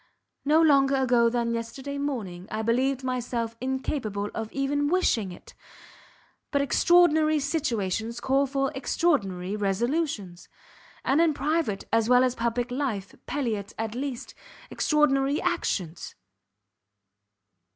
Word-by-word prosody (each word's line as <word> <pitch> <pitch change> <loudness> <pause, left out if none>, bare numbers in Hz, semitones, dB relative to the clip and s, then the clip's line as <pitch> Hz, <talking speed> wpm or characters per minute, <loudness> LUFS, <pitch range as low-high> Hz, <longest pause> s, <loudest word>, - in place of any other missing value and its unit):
No 305 +3 +4
longer 275 -3 +4
ago 245 -3 +3
than 235 0 -1
yesterday 265 +5 -5
morning, 205 -11 -4
I 220 0 -3
believed 260 +4 +1
myself 240 -2 -2
incapable 255 -6 -2
of 225 -1 -5
even 285 +1 0
wishing 265 - +1
it; 175 - -13 1.0
but 285 - +1
extraordinary 310 +2 +4
situations 230 - -2
call 270 +3 +2
for 275 +1 -1
extraordinary 205 - 0
resolutions, 210 - -2 0.6
and 280 +5 +3
in 325 -3 +3
private 295 -10 -1
as 225 0 +3
well 250 0 +6
as 255 -1 +2
public 235 +1 -2
life, 245 -8 -3
palliate, 225 -8 -3
at 225 -1 -3
least, 255 0 -5 0.4
extraordinary 285 -2 +2
actions. 175 -3 -2
255 Hz, 115 wpm, -26 LUFS, 220-280 Hz, 1.0 s, well